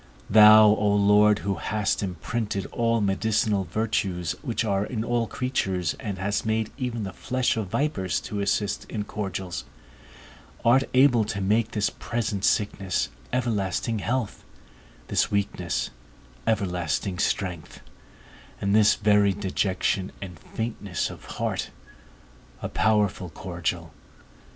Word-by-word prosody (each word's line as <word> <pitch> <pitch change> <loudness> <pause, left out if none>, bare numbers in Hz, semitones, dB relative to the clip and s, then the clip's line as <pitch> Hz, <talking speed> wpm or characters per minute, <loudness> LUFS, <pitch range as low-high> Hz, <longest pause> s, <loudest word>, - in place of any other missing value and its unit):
Thou, 110 0 +9
O 105 -1 +3
Lord, 105 +1 +5
who 100 - +1
hast 105 +2 -1
imprinted 100 +2 -3
all 115 -1 +1
medicinal 105 0 +1
virtues 90 -3 -1
which 120 -5 -2
are 100 -2 +1
in 110 0 -3
all 120 -1 0
creatures, 95 -11 -1
and 100 -3 -4
hast 100 +2 -1
made 110 0 -1
even 125 -4 -3
the 95 - -5
flesh 130 -1 0
of 110 -3 -2
vipers 95 - -1
to 105 - -5
assist 100 0 -1
in 105 - -4
cordials, 95 -4 -4 1.0
art 130 +3 +5
able 125 -3 +5
to 100 -1 -3
make 105 +4 +1
this 105 -1 +1
present 110 -4 -3
sickness, 100 -3 0 0.2
everlasting 110 -3 -1
health, 120 0 -2 0.6
this - - +1
weakness, 90 -10 -1 0.6
everlasting 90 -3 -1
strength, 90 -8 -2 0.8
and 100 0 0
this 110 0 +5
very 105 -1 +3
dejection 95 -1 -1
and 90 -5 -8
faintness 105 -4 -4
of - - -12
heart, - - -3 0.9
a - - -2
powerful 105 -4 +1
cordial. 85 -2 -4
105 Hz, 120 wpm, -25 LUFS, 95-110 Hz, 1.0 s, Thou